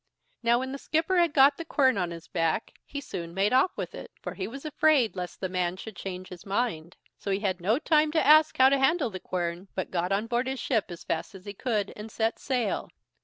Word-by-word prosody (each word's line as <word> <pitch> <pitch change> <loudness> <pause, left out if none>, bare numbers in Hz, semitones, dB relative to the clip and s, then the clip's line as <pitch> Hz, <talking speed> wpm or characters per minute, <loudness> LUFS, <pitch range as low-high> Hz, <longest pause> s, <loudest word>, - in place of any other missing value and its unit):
Now, 235 0 +4
when 260 +1 -3
the 275 - -5
skipper 325 +6 0
had 340 -2 +3
got 280 0 +5
the 335 - -5
quern 275 -5 +3
on 180 -3 -1
his 170 -1 -9
back, 165 +4 -1
he 285 - -5
soon 170 -9 -6
made 200 +4 +2
off 265 +8 +5
with - - -4
it, - - -8
for - - -6
he 190 -1 -4
was 275 +6 -9
afraid 300 -7 +3
lest 180 -1 -6
the 190 - -2
man 180 -1 -1
should 215 +2 -8
change 185 +1 -6
his 180 -2 -10
mind; 195 -6 -2 0.2
so - - -5
he 195 +1 0
had 190 -3 -1
no 210 +7 +2
time 305 0 +3
to 320 - +2
ask 310 +1 +6
how 260 0 +7
to 275 0 +2
handle 270 -2 +2
the 185 - -6
quern, 175 +1 -3
but 185 - -3
got 180 +1 -1
on 200 +3 +1
board 240 +2 -1
his 265 0 -3
ship 225 -7 +1
as 175 -1 -8
fast 165 +5 -3
as 190 - -12
he 205 - -6
could, 210 -2 -2
and 210 +1 -8
set 225 +1 -1
sail. 245 -5 -1
220 Hz, 245 wpm, -28 LUFS, 185-270 Hz, 0.2 s, how